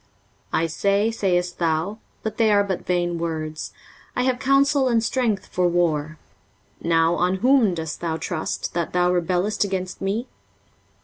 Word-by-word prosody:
23:036:005 - - +1
I - - +1
say, 200 +6 +1
sayest 180 -5 0
thou, 170 +5 0 0.2
(but 220 -1 -4
they 225 -2 +4
are 205 -1 +4
but 190 -3 -4
vain 175 -1 0
words) 155 -2 -4 0.4
I 250 - +1
have 255 -1 +1
counsel 275 0 +3
and 230 -2 +2
strength 230 -5 0
for 180 -1 0
war: 165 -3 0 0.6
now 165 0 +3
on 180 +2 +1
whom 240 -3 +3
dost 160 -2 -5
thou 165 -2 -1
trust, 160 -1 -3
that 170 -1 -2
thou 180 0 +3
rebellest 180 +4 +1
against 185 -2 -3
me? 200 +5 -1
180 Hz, 160 wpm, -23 LUFS, 170-215 Hz, 0.6 s, they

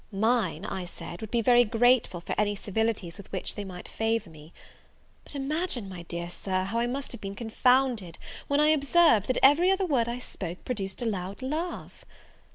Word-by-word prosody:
Mine, 205 -4 +1
I 190 -3 -4
said, 170 0 -9
would 220 - -6
be 235 0 +1
very 245 +1 +6
grateful 230 -5 +2
for - - -4
any 205 -1 +1
civilities 205 -3 -2
with 200 - -12
which - - -2
they 205 - -5
might 180 -2 -8
favour 225 -5 -1
me. 155 +1 -14 0.7
But - - -8
imagine, 280 - -2
my 185 -2 -8
dear 170 0 -5
Sir, 185 0 -2
how 210 +5 -2
I 240 - +1
must 270 +3 -4
have 240 - -6
been 195 0 -5
confounded, 235 -4 +1 0.3
when 285 0 +2
I 300 +1 +5
observed, 305 - +4
that 255 - +1
every 300 +7 +6
other 385 0 +2
word 250 -8 +1
I 240 - -3
spoke 180 -7 -7
produced 195 -3 -3
a - - -2
loud 195 0 -3
laugh! 315 +7 -4
225 Hz, 190 wpm, -28 LUFS, 190-255 Hz, 0.7 s, very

